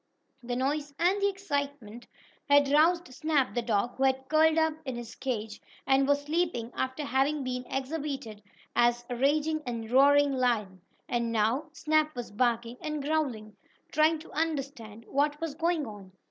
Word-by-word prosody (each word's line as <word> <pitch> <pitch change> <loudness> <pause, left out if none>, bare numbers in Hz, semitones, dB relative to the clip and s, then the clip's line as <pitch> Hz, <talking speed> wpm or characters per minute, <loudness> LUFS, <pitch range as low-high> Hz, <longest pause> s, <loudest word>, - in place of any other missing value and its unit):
The 245 0 -4
noise 285 +3 -2
and 365 +5 +2
the 400 - +3
excitement 285 - -4 0.4
had 285 -1 +5
roused 325 0 +3
Snap, 295 -1 +1
the 240 - 0
dog, 230 +1 -1
who 265 - 0
had 265 0 +1
curled 315 +1 +4
up 320 -1 +3
in 260 -4 -4
his 235 -1 -7
cage 220 -5 -4 0.2
and 270 +1 +3
was 285 0 +2
sleeping, 300 -7 -1
after 260 +3 -2
having 275 +2 +1
been 250 -1 -3
exhibited 270 -5 -4 0.3
as 240 0 +3
a - - -1
raging 305 +4 +1
and 230 -3 -5
roaring 285 +2 +5
lion, 220 -8 0 0.3
and 235 -1 -1
now 230 +8 +1
Snap 310 -1 +1
was 245 -3 -6
barking 235 +1 0
and 305 -2 -3
growling, 265 -9 -2 0.4
trying 310 +1 +3
to 310 - -13
understand 275 -8 -3
what 290 +2 0
was 325 -3 -3
going 330 0 0
on. 205 -4 -10
275 Hz, 160 wpm, -29 LUFS, 240-305 Hz, 0.4 s, had